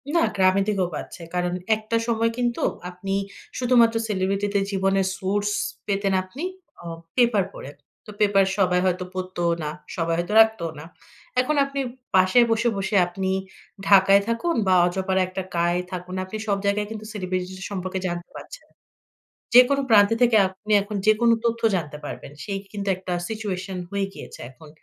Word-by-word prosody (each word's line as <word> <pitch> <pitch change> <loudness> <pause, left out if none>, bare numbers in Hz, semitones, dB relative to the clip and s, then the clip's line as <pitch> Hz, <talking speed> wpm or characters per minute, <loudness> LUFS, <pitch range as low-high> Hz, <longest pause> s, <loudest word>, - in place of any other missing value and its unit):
না 335 - +5
গ্রামের 190 0 +3
দিকেও 195 -4 +1
পাচ্ছে। 170 - -8
কারণ 180 0 -1 0.2
একটা 215 +1 -2
সময় 230 0 +1
কিন্তু 240 -1 -1 0.3
আপনি 195 +2 -5 0.4
শুধুমাত্র 235 -2 +4
celebrity 195 0 0
দের 200 -1 +2
জীবনের 195 0 +1
source 205 +2 -1 0.3
পেতেন 195 -1 0
আপনি 255 - -9 0.4
আ - - -12 0.3
পেপার 235 -5 +4
পড়ে। 140 - -9 0.3
তো - - -13
পেপার 200 -2 +4
সবাই 180 -2 +3
হয়তো 185 0 0
পড়তও 185 -2 -2
না। 150 - -2 0.3
সবাই 165 -1 0
হয়তো 175 +4 -3
রাখতোও 220 -8 +1
না। 155 - -9 0.6
এখন 300 +4 -1
আপনি 275 0 -5 0.4
পাশে 185 +5 +5
বসে, 230 +1 +2
বসে 195 +2 -2
আপনি 190 +2 -3 0.6
ঢাকায় 195 0 +6
থাকুন, 235 +9 0
বা 185 - +5
অজপাড়ায় 190 +1 0
একটা 185 0 -5
গাঁয়ে 175 +1 +1
থাকুন। 180 0 -6
আপনি 200 +4 -6
সব 200 -1 +1
জায়গায় 205 +1 +1
কিন্তু 215 -1 -7
celebrity 185 -2 -2
দের 190 - -7
সম্পর্কে 185 -1 -3
জানতে 175 0 -5
পারছেন। - - -11 0.9
যেকোনো 275 +3 +7
প্রান্তে 210 0 +6
থেকে 235 -3 +5
আপনি 190 +3 -8
এখন 205 +1 -6
যেকোনো 230 +2 +5
তথ্য 230 0 0
জানতে 150 -4 -3
পারবেন। 140 - -7
সেই 195 -2 -3
কিন্তু 200 -1 -5
একটা 185 -1 -5 0.2
situation 195 -3 -4
হয়ে 200 0 -1
গিয়েছে - - -10
এখন। 150 +4 -16
195 Hz, 160 wpm, -24 LUFS, 185-215 Hz, 0.9 s, যেকোনো